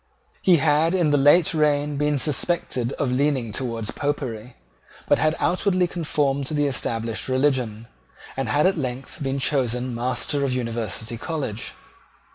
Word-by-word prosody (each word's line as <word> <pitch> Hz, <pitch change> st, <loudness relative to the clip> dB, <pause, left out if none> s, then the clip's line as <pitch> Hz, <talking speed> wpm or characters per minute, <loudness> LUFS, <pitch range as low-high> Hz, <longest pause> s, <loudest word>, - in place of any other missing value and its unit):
He 185 Hz, -, +5 dB
had 155 Hz, +3 st, +3 dB
in 170 Hz, -5 st, +2 dB
the -, -, +4 dB
late 150 Hz, +5 st, +5 dB
reign 150 Hz, -1 st, +1 dB
been 150 Hz, 0 st, +1 dB
suspected 135 Hz, -3 st, -1 dB
of 135 Hz, -3 st, -1 dB
leaning 130 Hz, -3 st, +1 dB
towards 115 Hz, -2 st, -3 dB
Popery, 130 Hz, -5 st, -3 dB, 0.5 s
but -, -, +4 dB
had 155 Hz, 0 st, +2 dB
outwardly 185 Hz, 0 st, +1 dB
conformed 145 Hz, -5 st, -1 dB
to 155 Hz, -, -2 dB
the 145 Hz, 0 st, +2 dB
established 115 Hz, -4 st, -2 dB
religion, 130 Hz, -5 st, 0 dB, 0.5 s
and 135 Hz, -4 st, -2 dB
had 145 Hz, +9 st, +3 dB
at 185 Hz, -3 st, +2 dB
length 130 Hz, +3 st, -5 dB
been 135 Hz, 0 st, -1 dB
chosen 125 Hz, -3 st, 0 dB
Master 130 Hz, +4 st, -1 dB
of 135 Hz, -2 st, 0 dB
University 115 Hz, -2 st, -3 dB
College. 135 Hz, -9 st, -4 dB
140 Hz, 145 wpm, -23 LUFS, 120-150 Hz, 0.5 s, He